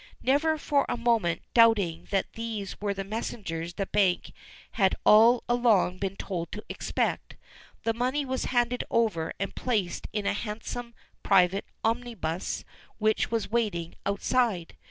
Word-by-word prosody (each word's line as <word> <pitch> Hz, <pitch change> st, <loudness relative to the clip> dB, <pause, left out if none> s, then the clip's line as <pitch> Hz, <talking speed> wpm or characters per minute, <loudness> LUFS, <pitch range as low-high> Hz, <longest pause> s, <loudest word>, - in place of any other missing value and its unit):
Never 310 Hz, +4 st, +2 dB
for 285 Hz, -2 st, +1 dB
a -, -, -1 dB
moment 230 Hz, -8 st, +1 dB
doubting 220 Hz, -8 st, +4 dB
that 195 Hz, -1 st, -1 dB
these 225 Hz, -4 st, -5 dB
were 200 Hz, -1 st, -1 dB
the 195 Hz, -, -3 dB
messengers 180 Hz, -5 st, -4 dB
the 195 Hz, -, -1 dB
bank 190 Hz, -3 st, +1 dB, 0.4 s
had 190 Hz, -3 st, +2 dB
all 230 Hz, +3 st, +7 dB
along 225 Hz, -7 st, +3 dB
been 195 Hz, -1 st, -2 dB
told 175 Hz, -4 st, -4 dB
to 210 Hz, -, -6 dB
expect, -, -, -2 dB, 0.5 s
the 225 Hz, -, +1 dB
money 255 Hz, +5 st, 0 dB
was 260 Hz, -1 st, -2 dB
handed 245 Hz, 0 st, +1 dB
over 205 Hz, -9 st, +1 dB
and 195 Hz, -, -3 dB
placed 210 Hz, -8 st, -1 dB
in 210 Hz, -2 st, -2 dB
a -, -, +2 dB
handsome 230 Hz, +3 st, -5 dB, 0.3 s
private 195 Hz, 0 st, +3 dB, 0.2 s
omnibus 225 Hz, -7 st, -2 dB, 0.3 s
which 215 Hz, 0 st, +1 dB
was 225 Hz, -2 st, -2 dB
waiting 205 Hz, -8 st, -1 dB
outside. 200 Hz, -2 st, 0 dB
215 Hz, 140 wpm, -28 LUFS, 190-235 Hz, 0.5 s, all